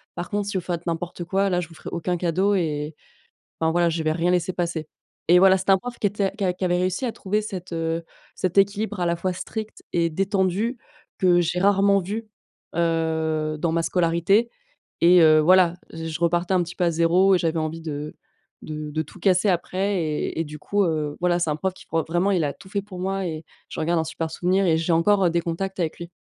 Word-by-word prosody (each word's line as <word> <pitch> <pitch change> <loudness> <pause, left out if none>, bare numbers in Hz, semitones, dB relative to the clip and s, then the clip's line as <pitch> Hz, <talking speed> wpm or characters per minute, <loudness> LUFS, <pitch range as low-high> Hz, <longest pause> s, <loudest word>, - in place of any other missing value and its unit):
par 175 - -5
contre, 205 -1 -2
si 195 - -2
vous - - -1
faites 175 -1 -4
n'importe 170 +1 -3
quoi, 195 +2 +1
là, 180 - +1
je 170 - -7
vous - - -14
ferai - - -8
aucun 175 +1 -2
cadeau 185 +4 +1
et 150 -4 -2 0.7
enfin, 160 0 +2
voilà, 175 0 +3
je 165 0 -2
vais 155 - +1
rien 170 +2 +1
laisser 180 0 0
passer» 170 -3 -3 0.4
et 175 - +8
voilà, 190 0 +6
c'était 190 +1 +1
un 190 - +6
prof 245 +4 -7
qui 205 - +2
était 200 -1 -1
qui 200 - -3
a 180 - +1
qui 180 - -7
avait 175 0 +2
réussi 185 +7 -1
à 240 - -1
trouver 210 +2 -1
cet, 190 -4 -7
heu, 165 0 -2 0.3
cet 185 0 -2
équilibre 205 +1 +2
à - - +1
la 170 - +1
fois 185 +2 -1
strict 215 +4 -6
et 170 -1 +2
détendu 195 +6 0 0.4
que 175 -2 +4
j'ai 175 +1 -1
rarement 200 +1 +4
vu, 215 +5 -5 0.5
heu, 160 -2 0
dans 165 +1 0
ma 165 0 +1
scolarité 175 +7 +2 0.5
et 180 +1 +7
heu, 155 -1 +7
voilà, 180 +1 +5 0.2
j 165 0 -5
je 160 - -5
repartais 175 +2 +1
un 180 - +3
petit 170 +1 -9
peu 180 - +2
à 170 - +2
0 175 +4 +4
et - - +1
j'avais 165 -1 0
envie 160 +1 -3
de 150 -1 -5 0.5
de 150 -1 -6
de 155 +1 -1
tout 175 +5 -15
casser 185 +2 +3
après 190 +2 0
et 155 0 -2
et - - 0
du 150 0 -9
coup, 205 +7 0
heu, 155 -3 -1
voilà, 175 0 +2
c'est 165 -3 0
un - - 0
prof 190 +3 -1
qui - - -15
pour 165 -1 0
vraiment, 175 +4 +1
il 180 -4 +2
a 145 - -1
tout - - -16
fait 200 +1 -1
pour 190 -3 -9
moi 195 +1 -2
et 160 -2 -5 0.2
j'en 160 - -3
garde 170 0 +2
un - - +1
super 160 0 -4
souvenir 185 +4 +1
et 165 -3 +3
j'ai 165 +1 0
encore, 195 +4 +3
heu, - - +4
des 170 0 +1
contacts 190 +4 -4
avec 165 0 -2
lui 170 0 -8
175 Hz, 240 wpm, -24 LUFS, 165-190 Hz, 0.7 s, et